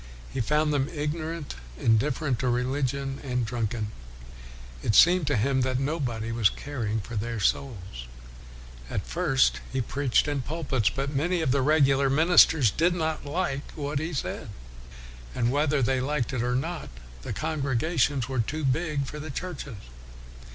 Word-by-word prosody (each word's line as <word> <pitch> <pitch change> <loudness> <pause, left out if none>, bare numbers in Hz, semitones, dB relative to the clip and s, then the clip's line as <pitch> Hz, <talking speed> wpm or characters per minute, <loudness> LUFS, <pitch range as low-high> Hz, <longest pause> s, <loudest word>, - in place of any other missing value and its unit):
He 135 - -1
found 150 +5 +1
them 140 0 +1
ignorant, 155 0 -4 0.3
indifferent 125 +3 +1
to 130 - -1
reli 125 +3 0
gion, 135 +1 -2
and 125 -3 -1
drunken. 110 -2 -2 0.9
It 105 - +1
seemed 175 -3 +6
to 145 - +2
him 130 +4 +2
that 130 0 0
nobody 130 -6 -2
was 115 -3 +3
caring 115 -7 -3
for 115 - -8
their 115 +2 -2
souls. 95 - -2 0.8
At 100 - -3
first 155 -6 +2
he 130 - -1
preached 135 +1 +1
in 145 -2 -1
pulpits, 135 -6 0
but 140 +4 -3
many 170 +5 +1
of 150 -5 +1
the 140 +1 +2
regular 140 -1 +4
ministers 155 - +5
did 175 - +2
not 160 -3 -2
like 140 -3 -2
what 145 -1 -2
he 160 +3 -3
said. 140 -4 -4 0.9
And 120 +1 +1
whether 145 -1 +2
they 130 +2 +1
liked 135 -2 -1
it 125 - -1
or 125 +1 0
not, 165 +6 -3 0.3
the - - -6
congregations 145 -3 0
were 130 -2 -2
too 150 +7 -2
big 145 +1 0
for 150 +3 -7
the 155 +1 -6
churches. 145 - -5
135 Hz, 160 wpm, -27 LUFS, 125-150 Hz, 0.9 s, seemed